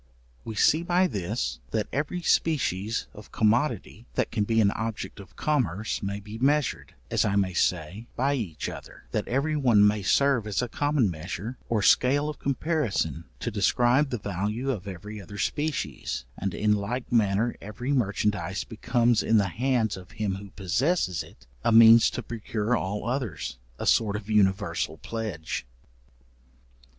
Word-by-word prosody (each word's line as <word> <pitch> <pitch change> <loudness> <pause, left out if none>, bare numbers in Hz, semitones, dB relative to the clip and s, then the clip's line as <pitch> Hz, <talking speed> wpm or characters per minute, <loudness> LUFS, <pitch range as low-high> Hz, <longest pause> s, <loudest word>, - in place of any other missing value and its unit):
We 110 - -6
see 155 +8 +4
by 175 +2 +2
this, 105 - -2
that 110 -2 -1
every 150 +6 -2
species 115 - +1
of 105 - -13
commodity 115 0 0
that - - 0
can 105 -3 0
be 115 +1 +2
an 100 -2 +4
object 110 -1 -4
of 100 -4 -13
commerce, 110 - -1
may 100 +1 -3
be 105 +2 -9
measured, 130 - +1 0.2
as - - +3
I 100 -1 +1
may 95 -2 +1
say, 90 +6 -1
by 135 +3 +1
each 105 - -3
other, - - -9
that - - -1
every 140 +5 0
one 120 -8 +5
may 105 0 +1
serve 125 +3 +2
as 105 - -1
a - - -2
common 145 -5 +1
measure, 90 +9 -6
or 110 -3 +1
scale 145 +7 +4
of 150 - -7
comparison 130 - -1 0.2
to 120 - -2
describe 120 +7 +3
the 125 - -2
value 105 +6 -2
of 100 -6 -5
every 105 +3 -7
other 100 +2 -10
species, 145 - -2
and 95 0 -3
in 105 0 +2
like 110 +5 -3
manner 110 0 +2
every 115 +7 -3
merchandize 100 -6 0
becomes 120 0 +1
in 110 - +3
the 100 -2 +2
hands 115 0 0
of 90 -1 -12
him 105 -3 -1
who 100 0 -10
possesses 95 - 0
it, - - -14 0.2
a - - +3
means 115 0 +8
to 125 - -5
procure 115 0 -2
all 100 0 -3
others—a 85 - -4
sort 105 -3 +3
of 105 +1 -5
universal 100 -1 +1
pledge. 105 -8 -4
110 Hz, 160 wpm, -27 LUFS, 100-125 Hz, 0.2 s, means